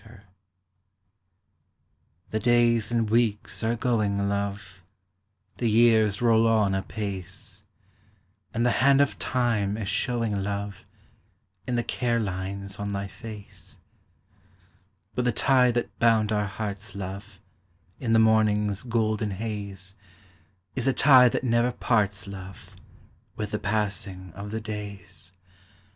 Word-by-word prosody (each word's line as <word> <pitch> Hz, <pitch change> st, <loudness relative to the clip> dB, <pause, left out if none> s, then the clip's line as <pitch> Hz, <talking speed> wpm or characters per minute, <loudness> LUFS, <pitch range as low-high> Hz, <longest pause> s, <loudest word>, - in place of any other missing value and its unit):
_ 110 Hz, -2 st, -15 dB, 2.1 s
The 110 Hz, -, 0 dB
days 120 Hz, -1 st, +3 dB
and 115 Hz, -2 st, +1 dB
weeks 110 Hz, -1 st, 0 dB
are 115 Hz, +1 st, +1 dB
going, 105 Hz, -4 st, 0 dB
love, 100 Hz, -2 st, -4 dB, 0.7 s
The 120 Hz, 0 st, 0 dB
years 110 Hz, -1 st, +4 dB
roll 115 Hz, -1 st, +4 dB
on 110 Hz, -3 st, +3 dB
apace, 95 Hz, -1 st, -5 dB, 0.9 s
And 115 Hz, +2 st, 0 dB
the 120 Hz, -, +4 dB
hand 140 Hz, +1 st, +5 dB
of 140 Hz, -1 st, +2 dB
time 110 Hz, -5 st, 0 dB
is 105 Hz, -3 st, -4 dB
showing, 110 Hz, 0 st, 0 dB
love, 100 Hz, 0 st, -3 dB, 0.9 s
In 125 Hz, -, -1 dB
the 120 Hz, -, +1 dB
care 120 Hz, -1 st, 0 dB
lines 100 Hz, 0 st, -4 dB
on 100 Hz, 0 st, -3 dB
thy 100 Hz, 0 st, -2 dB
face; 100 Hz, +1 st, -10 dB, 1.4 s
But 125 Hz, -, -1 dB
the 125 Hz, -, +3 dB
tie 125 Hz, +2 st, +4 dB
that 120 Hz, 0 st, -2 dB
bound 110 Hz, -2 st, +3 dB
our 105 Hz, -1 st, +1 dB
hearts, 100 Hz, 0 st, -6 dB
love, 100 Hz, +1 st, -7 dB, 0.6 s
In 115 Hz, -3 st, 0 dB
the -, -, +6 dB
morningâs 105 Hz, 0 st, +2 dB
golden 110 Hz, -2 st, 0 dB
haze, 100 Hz, -2 st, -5 dB, 0.8 s
Is 130 Hz, 0 st, -1 dB
a 135 Hz, -, +4 dB
tie 130 Hz, -3 st, +7 dB
that -, -, -2 dB
never 120 Hz, 0 st, +2 dB
parts, 105 Hz, -5 st, 0 dB
love, 95 Hz, -1 st, -10 dB, 0.6 s
With 105 Hz, -1 st, -4 dB
the 105 Hz, -, -2 dB
passing 100 Hz, -3 st, -3 dB
of 100 Hz, +1 st, -7 dB
the 110 Hz, +1 st, -4 dB
days. 100 Hz, -4 st, -7 dB
105 Hz, 125 wpm, -26 LUFS, 100-115 Hz, 2.1 s, tie